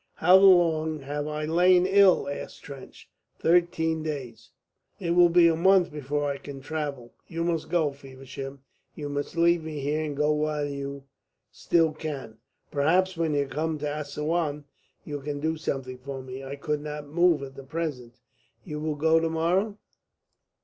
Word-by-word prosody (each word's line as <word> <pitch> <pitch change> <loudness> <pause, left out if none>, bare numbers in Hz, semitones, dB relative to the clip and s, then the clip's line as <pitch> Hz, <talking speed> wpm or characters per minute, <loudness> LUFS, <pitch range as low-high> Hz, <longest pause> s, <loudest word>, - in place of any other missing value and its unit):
"How 180 +3 +6
long 165 -5 +4
have 145 +2 -4
I 150 0 -3
lain 180 +3 +4
ill?" 195 -3 +5
asked 140 - -7
Trench. 140 -2 -11 0.3
"Thirteen 160 -2 +2
days." 135 -7 -6 0.5
"It 170 -3 -2
will 175 0 +6
be 170 0 +6
a 165 - +3
month 185 +1 +4
before 145 0 -2
I 140 -1 -2
can 140 -1 -9
travel. 140 -4 -5
You 165 -1 -3
must 170 -2 -1
go, 160 -4 +1
Feversham. 135 0 -9 0.3
You 145 -1 -5
must 145 +4 -4
leave 170 0 +3
me 155 -2 -5
here, 150 +3 -1
and 145 -2 -4
go 150 +1 +2
while 150 -1 -1
you 140 -1 -5 0.5
still 165 -2 +2
can. 140 -8 -6 0.3
Perhaps 180 +6 +2
when 165 -3 0
you 140 -1 +1
come 155 +3 -2
to 150 - -5
Assouan 150 +1 -2 0.4
you 145 -2 -6
can 145 +1 -4
do 160 +2 -1
something 135 -5 -4
for 135 0 -7
me. 130 +1 -8
I 135 +1 -6
could 150 +1 -2
not 150 0 -6
move 165 +1 +2
at 135 0 -10
present. 145 -7 -4 0.5
You 150 -3 -5
will 155 0 -2
go 160 +2 +3
to 165 0 0
morrow?" 180 +6 0
150 Hz, 165 wpm, -26 LUFS, 140-165 Hz, 0.5 s, How